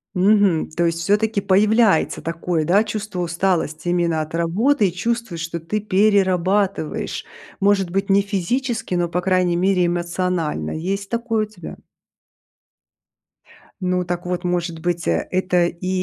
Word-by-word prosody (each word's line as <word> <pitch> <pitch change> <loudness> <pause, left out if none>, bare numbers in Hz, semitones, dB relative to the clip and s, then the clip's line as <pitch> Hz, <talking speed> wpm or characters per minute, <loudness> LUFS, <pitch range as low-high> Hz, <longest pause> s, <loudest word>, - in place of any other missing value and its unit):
Мгм. 195 -3 +3
То 170 +2 0
есть 165 0 -2
всё-таки 210 +4 +1
появляется 205 0 +3
такое, 165 -1 -2
да, 195 +6 +4
чувство 210 -3 -5
усталости 175 -2 -1
именно 170 -2 +1
от 155 +1 -7
работы 200 +9 +2
и - - -2
чувствуешь, 230 -4 -3
что 170 +1 -4
ты 165 +7 -3
перерабатываешь. 195 -3 +1 0.3
Может 195 -3 +2
быть 195 +2 -1
не 195 +1 +5
физически, 220 +3 -2
но, 175 -1 +1
по 175 +1 -2
крайней 180 -1 +2
мере, 185 0 +2
эмоционально. 175 -1 -1
Есть 195 +5 -3
такое 230 -2 -1
у 210 - -19
тебя? 180 -6 -10 2.0
Ну, 180 0 0
так 175 0 -4
вот 180 0 -3
может 175 -2 -2
быть, 175 0 -2
э, 80 -1 +1
это 180 -1 +2
и 175 +1 -5
180 Hz, 140 wpm, -21 LUFS, 170-205 Hz, 2.0 s, не